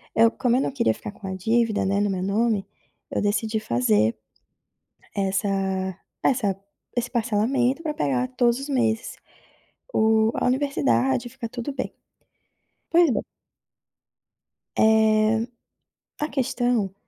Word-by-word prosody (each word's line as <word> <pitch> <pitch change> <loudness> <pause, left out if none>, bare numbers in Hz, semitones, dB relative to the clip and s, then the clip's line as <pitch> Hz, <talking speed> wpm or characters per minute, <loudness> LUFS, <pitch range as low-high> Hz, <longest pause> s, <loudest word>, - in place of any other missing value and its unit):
eu 230 +1 +6
como 250 -2 +1
eu 260 - +3
não - - -1
queria 245 -4 +1
ficar - - -8
com 200 -1 -10
a 190 - -3
dívida, 220 +2 +1
né, 200 +1 +1
no 205 - +1
meu 185 -1 -2
nome, 210 0 +1 0.5
eu - - -1
decidi 215 +1 0
fazer, 115 - +2 1.0
essa 195 +1 0 0.7
essa 205 -7 +1 0.4
esse 245 0 -1
parcelamento 240 +5 +1
pra 305 -2 -2
pegar 255 -4 0
todos 240 0 +3
os 275 +2 -6
meses, 230 -4 0 0.8
o 220 0 +3
a - - 0
universidade 145 - +1
e - - -9
ficar 230 - -6
tudo 245 +4 -5
bem. 260 - -4 1.0
Pois 340 -3 +5
bem. - - 0 1.6
Eh, 220 +1 +4 0.7
a 300 - 0
questão, 245 -7 0
225 Hz, 130 wpm, -24 LUFS, 205-250 Hz, 1.6 s, eu